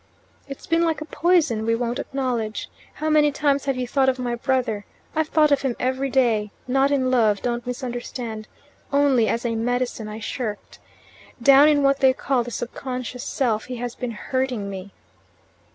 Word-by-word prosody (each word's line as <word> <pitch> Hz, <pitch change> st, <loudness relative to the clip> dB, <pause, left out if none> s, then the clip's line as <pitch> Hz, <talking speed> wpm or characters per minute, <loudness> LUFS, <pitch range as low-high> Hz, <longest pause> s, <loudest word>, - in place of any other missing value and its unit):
"It's 275 Hz, -1 st, -9 dB
been 330 Hz, +1 st, +2 dB
like 325 Hz, -4 st, +1 dB
a 310 Hz, -, -6 dB
poison 315 Hz, -9 st, +2 dB
we 230 Hz, +1 st, +2 dB
won't 240 Hz, +2 st, -2 dB
acknowledge. 245 Hz, -6 st, -3 dB, 0.2 s
How 310 Hz, -, -3 dB
many 300 Hz, -1 st, +4 dB
times 280 Hz, -1 st, +1 dB
have 275 Hz, -1 st, 0 dB
you 250 Hz, -1 st, -2 dB
thought 265 Hz, +1 st, +3 dB
of 260 Hz, -, 0 dB
my 245 Hz, -1 st, -2 dB
brother? 240 Hz, -4 st, -1 dB, 0.3 s
I've 315 Hz, 0 st, +1 dB
thought 305 Hz, -1 st, +3 dB
of 285 Hz, -, +3 dB
him 265 Hz, -3 st, -1 dB
every 260 Hz, +2 st, -1 dB
day 235 Hz, -5 st, +2 dB, 0.2 s
not 270 Hz, +2 st, +3 dB
in 260 Hz, -3 st, +1 dB
love; 220 Hz, -5 st, +2 dB
don't 240 Hz, -1 st, -2 dB
misunderstand; 245 Hz, -3 st, -5 dB, 0.4 s
only 280 Hz, -5 st, +3 dB
as 230 Hz, +4 st, -1 dB
a 235 Hz, -, 0 dB
medicine 240 Hz, -1 st, -1 dB
I 215 Hz, +1 st, -6 dB
shirked. 220 Hz, -1 st, -5 dB, 0.6 s
Down 275 Hz, +4 st, +7 dB
in 295 Hz, -2 st, +3 dB
what 275 Hz, 0 st, +3 dB
they 265 Hz, -1 st, +5 dB
call 255 Hz, -1 st, 0 dB
the 240 Hz, -, -7 dB
subconscious 250 Hz, +1 st, -5 dB
self 225 Hz, -5 st, -1 dB
he 255 Hz, -, -6 dB
has 240 Hz, 0 st, -4 dB
been 250 Hz, -, -4 dB
hurting 240 Hz, -2 st, -2 dB
me." 190 Hz, +1 st, -7 dB
255 Hz, 180 wpm, -23 LUFS, 230-275 Hz, 0.6 s, Down